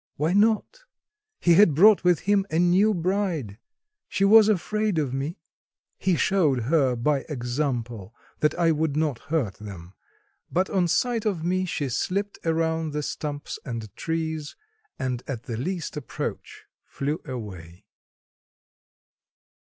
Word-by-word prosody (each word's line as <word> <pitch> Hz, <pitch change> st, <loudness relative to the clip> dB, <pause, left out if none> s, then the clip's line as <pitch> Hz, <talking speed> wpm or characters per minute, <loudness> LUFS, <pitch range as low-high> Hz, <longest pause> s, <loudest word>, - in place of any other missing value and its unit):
Why 155 Hz, +4 st, 0 dB
not? 220 Hz, -, +2 dB, 0.6 s
He 175 Hz, -, +4 dB
had 170 Hz, -4 st, +6 dB
brought 205 Hz, +5 st, +6 dB
with 180 Hz, -2 st, +3 dB
him 200 Hz, 0 st, +2 dB
a 160 Hz, -, -1 dB
new 180 Hz, +5 st, +4 dB
bride. 175 Hz, -, -1 dB, 0.5 s
She 195 Hz, -, +1 dB
was 215 Hz, +1 st, +7 dB
afraid 210 Hz, 0 st, 0 dB
of 140 Hz, -5 st, 0 dB
me. 140 Hz, +5 st, -3 dB, 0.6 s
He 185 Hz, -2 st, +2 dB
showed 160 Hz, -10 st, +2 dB
her 135 Hz, 0 st, +2 dB
by 140 Hz, +4 st, +1 dB
example 120 Hz, -5 st, -3 dB, 0.2 s
that 150 Hz, -, +2 dB
I 170 Hz, -1 st, +3 dB
would 155 Hz, -1 st, 0 dB
not 150 Hz, -6 st, 0 dB
hurt 135 Hz, -, -2 dB
them, 95 Hz, -4 st, -10 dB, 0.6 s
but 185 Hz, +2 st, 0 dB
on 185 Hz, -3 st, +2 dB
sight 230 Hz, +4 st, 0 dB
of 180 Hz, -6 st, -1 dB
me 185 Hz, +2 st, 0 dB
she 145 Hz, -5 st, -2 dB
slipped 200 Hz, -, -2 dB
around 160 Hz, -1 st, 0 dB
the 150 Hz, 0 st, -2 dB
stumps 145 Hz, 0 st, -5 dB
and 115 Hz, -6 st, -6 dB
trees, 160 Hz, -2 st, -3 dB, 0.4 s
and 130 Hz, -4 st, -2 dB
at 125 Hz, -5 st, -5 dB
the 120 Hz, -6 st, -5 dB
least 165 Hz, +8 st, -4 dB
approach 150 Hz, -4 st, -6 dB, 0.2 s
flew 145 Hz, +3 st, -3 dB
away. 95 Hz, -7 st, -8 dB
160 Hz, 135 wpm, -25 LUFS, 130-185 Hz, 0.6 s, was